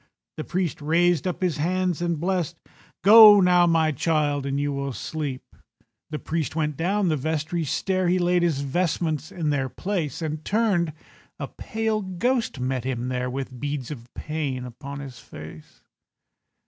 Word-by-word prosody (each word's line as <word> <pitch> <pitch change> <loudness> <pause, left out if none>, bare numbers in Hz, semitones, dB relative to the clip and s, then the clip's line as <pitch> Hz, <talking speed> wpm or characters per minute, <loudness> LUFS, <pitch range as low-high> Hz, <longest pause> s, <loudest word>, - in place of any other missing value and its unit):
The 155 - -3
priest 175 -5 -2
raised 170 +2 +2
up 180 +1 -3
his 175 -4 0
hands 180 +2 0
and 170 -3 -1
blest— 175 -2 -1 0.5
"Go 210 0 +10
now, 180 -2 +5
my 160 -2 +3
child, 145 -1 0
and 140 +1 -1
you 145 0 -1
will 140 -1 -3
sleep." 145 -1 -4 0.7
The 155 - -3
priest 160 -1 -3
went 150 -2 -1
down 190 +5 +1
the 155 - +2
vestry 160 +4 -2
stair, 185 +5 0
He 180 +1 +3
laid 180 0 +2
his 165 -5 +1
vestments 155 +1 -1
in 155 -4 -1
their 135 -2 0
place, 175 -4 -3
And 155 0 -3
turned—a 185 -8 -2
pale 220 -1 -2
ghost 205 - -1
met 130 0 -1
him 125 -1 -3
there, 125 0 -2
With 130 -1 -5
beads 145 -1 -3
of 120 -4 -9
pain 145 -5 -3
upon 140 +4 -8
his 130 -3 -9
face. 75 -5 -12
155 Hz, 160 wpm, -24 LUFS, 140-180 Hz, 0.7 s, Go